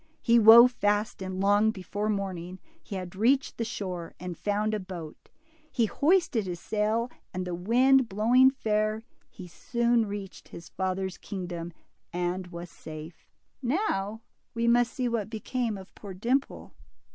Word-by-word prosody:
He 235 Hz, 0 st, +5 dB
wove 230 Hz, +3 st, +9 dB
fast, 210 Hz, -1 st, 0 dB
and 185 Hz, 0 st, -4 dB
long 205 Hz, +2 st, +4 dB
before 205 Hz, +1 st, -3 dB
morning 185 Hz, -3 st, -3 dB, 0.2 s
he 200 Hz, -, -8 dB
had 185 Hz, -1 st, -6 dB
reached 255 Hz, +7 st, +1 dB
the -, -, +1 dB
shore, 185 Hz, -7 st, -5 dB
and 180 Hz, -1 st, -6 dB
found 210 Hz, +4 st, -1 dB
a 215 Hz, -, 0 dB
boat. 175 Hz, -5 st, -9 dB, 0.4 s
He 235 Hz, -, +2 dB
hoisted 290 Hz, -, +1 dB
his 175 Hz, -1 st, -4 dB
sail, 220 Hz, +5 st, -1 dB, 0.2 s
and 185 Hz, 0 st, -2 dB
the 180 Hz, -, -4 dB
wind 245 Hz, +8 st, +3 dB
blowing 235 Hz, +6 st, +5 dB
fair, 215 Hz, -4 st, -1 dB, 0.3 s
he 185 Hz, -4 st, -11 dB
soon 235 Hz, +5 st, 0 dB
reached 200 Hz, -2 st, -7 dB
his 170 Hz, -, -11 dB
father's 190 Hz, 0 st, -3 dB
kingdom 175 Hz, -3 st, -6 dB, 0.4 s
and 180 Hz, +1 st, -2 dB
was 170 Hz, -1 st, -9 dB
safe. 155 Hz, +1 st, -10 dB, 0.3 s
Now 230 Hz, -, -1 dB, 0.3 s
we 230 Hz, 0 st, 0 dB
must 240 Hz, 0 st, +4 dB
see 255 Hz, -2 st, -2 dB
what 225 Hz, -3 st, -2 dB
became 225 Hz, 0 st, -3 dB
of 190 Hz, 0 st, -12 dB
poor 195 Hz, -3 st, -9 dB
Dimple. 250 Hz, +8 st, -2 dB
210 Hz, 150 wpm, -28 LUFS, 185-235 Hz, 0.4 s, wove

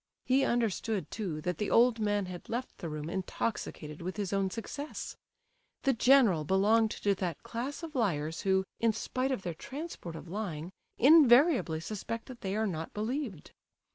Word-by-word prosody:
He 265 Hz, +1 st, +3 dB
understood, 225 Hz, -4 st, 0 dB
too, 175 Hz, -8 st, -3 dB
that 180 Hz, 0 st, -2 dB
the 210 Hz, -, -1 dB
old 235 Hz, 0 st, +5 dB
man 205 Hz, -2 st, +1 dB
had 180 Hz, -1 st, -8 dB
left 245 Hz, +3 st, -4 dB
the 170 Hz, -, -4 dB
room 150 Hz, 0 st, -5 dB
intoxicated 170 Hz, -4 st, -4 dB
with 185 Hz, +4 st, -4 dB
his 200 Hz, -2 st, -2 dB
own 195 Hz, -1 st, +1 dB
success. 280 Hz, +9 st, -6 dB, 0.7 s
The 270 Hz, -, +3 dB
general 230 Hz, -, +5 dB
belonged 210 Hz, +6 st, +3 dB
to 205 Hz, -1 st, 0 dB
that 180 Hz, -5 st, -4 dB
class 260 Hz, +8 st, -5 dB
of 325 Hz, -2 st, -6 dB
liars, 165 Hz, -, 0 dB
who, 190 Hz, -1 st, +2 dB, 0.2 s
in 230 Hz, -1 st, +3 dB
spite 255 Hz, +4 st, -2 dB
of 250 Hz, -8 st, -2 dB
their 175 Hz, -, -3 dB
transports 265 Hz, -, -7 dB
of 170 Hz, -, -10 dB
lying, 175 Hz, -3 st, -4 dB, 0.3 s
invariably 265 Hz, -, +6 dB
suspect 220 Hz, +4 st, -5 dB
that 250 Hz, -2 st, -10 dB
they 195 Hz, 0 st, -2 dB
are 220 Hz, +1 st, +1 dB
not 165 Hz, -5 st, -4 dB
believed. 220 Hz, -, -3 dB
210 Hz, 170 wpm, -31 LUFS, 180-245 Hz, 0.7 s, invariably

